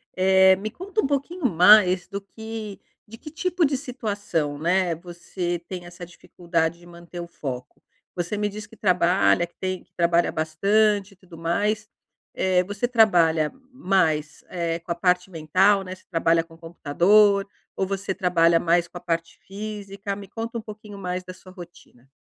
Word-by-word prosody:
Eh, 190 0 +5
me 210 +3 -5
conta 395 - -2
pouquinho 285 +4 -2
mais 185 -2 +6
do 200 - -5
que 220 0 -8 0.3
de 220 - -11
que 305 - -10
tipo 350 +2 0
de 280 -1 0
situação, 205 - -3
né, 175 +2 +1
você 175 +1 -5
tem 180 -2 -7
essa 175 0 -10
dificuldade 170 -1 -3
de 175 - -17
manter 170 0 -11
o 170 - -6
foco. 130 -6 -7 0.3
Você 175 +4 -3
me 210 0 0
diz 210 +1 -7
que - - -17
trabalha, 180 -1 +3
que 175 - -23
tem 185 -1 -3
que - - -37
trabalhar 170 0 +2
bastante 200 +6 +1
e - - -18
tudo 180 -3 -15
mais. 205 +6 -1 0.5
Eh, 185 -1 +2
você 205 +5 -3
trabalha 170 -10 +3 0.2
mais, 165 - 0
eh, 170 -2 -2
com 170 +1 -8
a - - -11
parte 180 +1 +1
mental, 190 +5 +2
né, 185 -1 -7
você 185 - -16
trabalha 165 -1 +2
com 165 0 -18
computador? 195 +5 +3 0.3
Ou 190 - 0
você 195 0 -3
trabalha 170 -3 +3
mais 170 +1 +2
com 175 - -10
a - - -10
parte 165 0 -3
física? 200 0 -6
Me 200 0 -10
conta 230 +3 -5
pouquinho 210 -1 -11
mais 180 -1 -4
da 185 0 -9
sua 185 - -15
rotina. 175 -8 -15
185 Hz, 170 wpm, -24 LUFS, 170-205 Hz, 0.5 s, mais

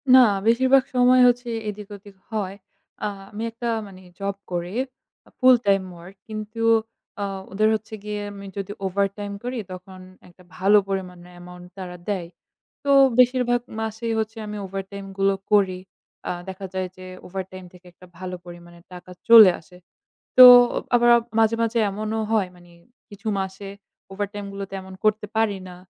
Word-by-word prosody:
না, - - +10 0.3
বেশিরভাগ 260 +3 +4
সময় 250 +1 +5
হচ্ছে 245 0 +1 0.2
এদিক-ওদিক 205 -1 -10 0.2
হয়। 200 -3 -3 0.5
আ - - +1 0.2
আমি 215 +2 -5
একটা 235 +1 -6 0.2
মানে 190 -1 -14 0.2
job 200 0 -2 0.2
করি 175 +2 -3 0.7
full 255 0 +7
time 195 -1 +3
work 180 +3 -13
কিন্তু 215 +1 -6 0.6
আ - - 0 0.3
ওদের 215 +2 +2
হচ্ছে 220 +1 -8
গিয়ে 210 0 -4
আমি 200 0 -10
যদি 200 0 -4
overtime 200 +1 -2
করি 250 +1 -4
তখন 185 +1 -10 0.3
একটা 180 +1 -20
ভালো 195 +3 +5
পরিমাণে 180 -2 -5
amount 180 0 -12
তারা 180 -2 -7
দেয়। 185 -4 -2 0.6
তো 285 - -3 0.3
বেশিরভাগ 250 -1 +3 0.2
মাসেই 220 +1 -3
হচ্ছে 220 +1 -4
আমি 210 0 -6
overtime 195 +1 -7
গুলো 195 0 +2 0.2
করি। 190 -3 +3 0.5
আ - - 0 0.2
দেখা 190 +1 -7
যায় 185 -1 -2
যে 185 - -10 0.2
overtime 185 0 -7
থেকে 180 0 -18
একটা 180 - -17
ভালো 185 0 -6
পরিমাণে 175 0 -13
টাকা 180 +1 -11 0.2
চলে 220 -5 +10
আসে। 180 +2 -18 0.6
তো 255 - +12 0.5
আবার 240 0 +4 0.3
মাঝে, 225 0 +3
মাঝে 230 0 0
এমনও 215 +2 -3
হয় 210 -4 +2
মানে 175 -1 -19 0.4
কিছু 205 +2 -10
মাসে 190 +1 -5 0.4
overtime 205 +1 -5
গুলোতে 195 0 -7
এমন 190 0 -12
করতে 215 0 +1
পারি 215 -3 +1
না। 180 - -10
200 Hz, 155 wpm, -23 LUFS, 185-220 Hz, 0.7 s, তো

